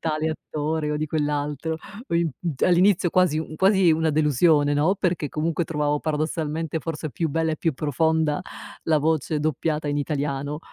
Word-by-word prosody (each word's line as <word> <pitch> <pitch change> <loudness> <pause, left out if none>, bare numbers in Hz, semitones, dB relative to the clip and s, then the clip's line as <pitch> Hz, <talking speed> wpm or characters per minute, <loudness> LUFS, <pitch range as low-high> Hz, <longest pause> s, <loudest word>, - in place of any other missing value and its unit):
tale 155 0 -1
attore 155 0 -3
o 150 - 0
di 155 +1 -2
quell'altro." 150 +1 -2 0.3
Ho - - -2
imp 170 -4 +1
mhmm, 170 -4 -2
all'inizio 180 0 +4
quasi 180 -4 +3
u 155 0 -5
quasi 190 -1 +4
una 160 0 +1
delusione, 150 0 +3
no, 160 +7 +2
perché 175 -6 -1
comunque 160 +4 -1
trovavo 150 -2 -1
paradossalmente 155 +1 -2
forse 155 -1 -4
più 165 -2 -1
bella 160 +2 0
e 155 - -3
più 160 -1 -1
profonda 155 +1 +1 0.4
la 155 -1 +3
voce 155 0 0
doppiata 155 +1 -1
in 145 0 0
italiano. 145 0 -2
155 Hz, 170 wpm, -24 LUFS, 150-165 Hz, 0.4 s, all'inizio